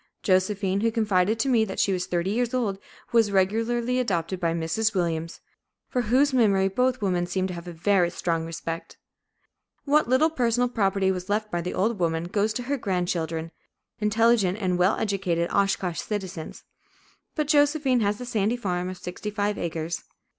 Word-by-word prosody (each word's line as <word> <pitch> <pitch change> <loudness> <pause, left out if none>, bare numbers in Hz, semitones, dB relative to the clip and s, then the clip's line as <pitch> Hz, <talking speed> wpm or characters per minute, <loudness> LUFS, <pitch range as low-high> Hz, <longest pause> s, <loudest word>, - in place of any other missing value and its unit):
Josephine, 190 +1 +1
who 230 +1 +2
confided 215 -2 +1
to 250 - 0
me 240 -4 +4
that 195 -3 -4
she 195 - +2
was 180 -1 -2
thirty 175 +2 -1
years 245 +3 0
old, 205 -6 -1 0.3
was 225 -3 +3
regularly 230 +6 +1
adopted 185 -6 -1
by 170 -2 +1
Mrs. 170 +7 0
Williams, 165 -2 -2 0.5
for 250 - 0
whose 260 +5 +2
memory 200 -6 +3
both 250 +3 0
women 180 -3 0
seem 185 +1 -1
to 185 - -4
have 170 0 -8
a - - -5
very 175 +1 +2
strong 165 -2 -2
respect. 165 0 -6 0.9
What 290 -4 +3
little 290 +6 +4
personal 245 -3 +1
property 195 -4 +1
was 185 +1 -5
left 215 +1 -1
by 175 - -1
the 180 - -4
old 210 +2 0
woman 165 -1 0
goes 205 +5 0
to 245 - -3
her 280 +3 -1
grandchildren, 170 -6 -2 0.5
intelligent 215 -2 +3
and 180 -3 0
well 185 +3 +3
educated 185 -5 -1
Oshkosh 195 -3 0
citizens, 190 -6 -5 0.7
but 305 -2 -1
Josephine 290 -3 +3
has 205 -1 +1
the 250 - -7
sandy 225 0 0
farm 180 -5 -2
of 185 - -7
sixty 180 +4 -6
five 205 0 -1
acres. 165 0 -3
200 Hz, 175 wpm, -25 LUFS, 180-230 Hz, 0.9 s, me